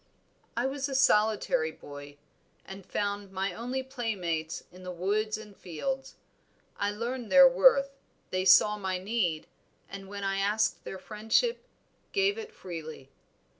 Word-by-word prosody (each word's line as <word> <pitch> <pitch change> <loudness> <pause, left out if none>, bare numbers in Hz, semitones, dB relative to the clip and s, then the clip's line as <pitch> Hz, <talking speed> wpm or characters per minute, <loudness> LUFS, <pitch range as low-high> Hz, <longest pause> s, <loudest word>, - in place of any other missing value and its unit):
"I 240 - +1
was 275 +1 -2
a 270 - -3
solitary 210 -10 +3
boy, 145 -1 -11 0.5
and 195 0 -9
found 200 0 -3
my 195 0 -2
only 250 +6 -3
playmates 190 -12 -3
in 180 +1 -14
the 180 - -7
woods 210 +5 -1
and 210 -2 -12
fields. 265 - -4 0.6
I 200 - 0
learned 235 +2 -4
their 275 -1 +10
worth, 275 - +4 0.3
they 185 0 0
saw 195 +3 +6
my 190 -2 -1
need, 185 -5 -1 0.4
and 195 0 -9
when 200 0 -6
I 195 0 0
asked 210 +2 +1
their 190 - -6
friendship, 220 - 0 0.5
gave 400 +2 +2
it 445 0 -8
freely. 160 - -8
205 Hz, 140 wpm, -29 LUFS, 185-255 Hz, 0.6 s, their